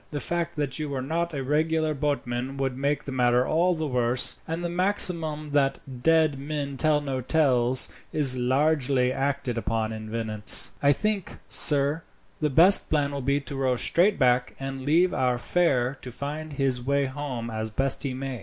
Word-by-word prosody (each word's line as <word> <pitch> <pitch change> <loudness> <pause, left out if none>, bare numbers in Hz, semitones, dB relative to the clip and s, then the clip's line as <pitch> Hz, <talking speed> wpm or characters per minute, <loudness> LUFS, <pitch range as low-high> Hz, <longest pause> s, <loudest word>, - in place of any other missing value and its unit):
The 145 - -4
fact 170 +2 -3
that 145 -2 -3
you 150 -1 -4
were 135 -2 -4
not 170 +4 -2
a 140 -3 -4
regular 155 +2 0
boatman 135 -3 -3
would 135 -2 -2
make 140 +2 -1
the 140 - -7
matter 125 -1 +2
all 175 +5 +1
the 160 -1 -3
worse, 125 -2 0
and 165 +2 -4
the - - 0
maxim 170 -4 +1
that 140 -1 +1 0.2
'dead 160 -2 +2
men 140 -1 -4
tell 150 +1 +1
no 135 -2 -3
tales' 130 -3 +3 0.2
is 140 -4 +3
largely 130 0 +1
acted 135 -3 -2
upon 110 -1 -2
in 110 0 -8
Venice. 110 -2 +1
"I 140 - +4
think, 210 +4 -2
sir, 145 +1 +3 0.4
the 150 - 0
best 175 +8 +6
plan 145 -2 0
will 140 -1 -4
be 140 +2 0
to 140 0 -8
row 130 -2 0
straight 180 - +1
back, 125 -1 +1
and 135 0 -6
leave 165 +7 +2
our 125 -1 0
fare 135 -4 0
to 125 - -8
find 150 +4 -6
his 135 -3 -1
way 140 +1 +1
home 130 -4 -5
as 110 0 -4
best 135 +5 -1
he 135 -3 -3
may." 135 -2 -5
140 Hz, 180 wpm, -25 LUFS, 125-155 Hz, 0.4 s, best